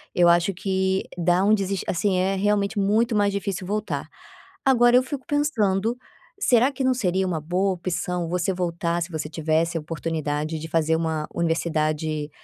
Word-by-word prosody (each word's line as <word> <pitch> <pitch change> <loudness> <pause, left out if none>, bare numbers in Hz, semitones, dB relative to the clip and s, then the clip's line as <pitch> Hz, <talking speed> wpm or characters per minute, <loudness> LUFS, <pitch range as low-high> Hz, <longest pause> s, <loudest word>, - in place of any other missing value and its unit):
eu 175 -1 +5
acho 175 +3 +3
que 190 +1 0
dá 175 +2 +2
um 210 - +4
deses 195 -2 0
assim, 185 +2 +1
é 190 +2 +1
realmente 205 +1 +1
muito 220 +4 +2
mais 205 -1 +2
difícil 195 -2 -3
voltar. 210 +2 -3 0.6
Agora 240 -2 +5
eu 255 - +4
fico 265 0 -6
pensando, 230 -7 +1 0.4
será 250 - +4
que 270 -1 -4
não 260 0 +3
seria 190 -5 0
uma 170 -3 -1
boa 180 +5 0
opção 180 -1 -3
você 180 +2 0
voltar, 170 -1 -1
se 170 - -3
você 155 -1 -4
tivesse 160 +1 0
a 160 - -3
oportunidade 155 -1 -3
de 160 - -6
fazer 160 0 +2
uma 160 -2 -2
universidade, 155 -2 -1
180 Hz, 170 wpm, -24 LUFS, 165-205 Hz, 0.6 s, eu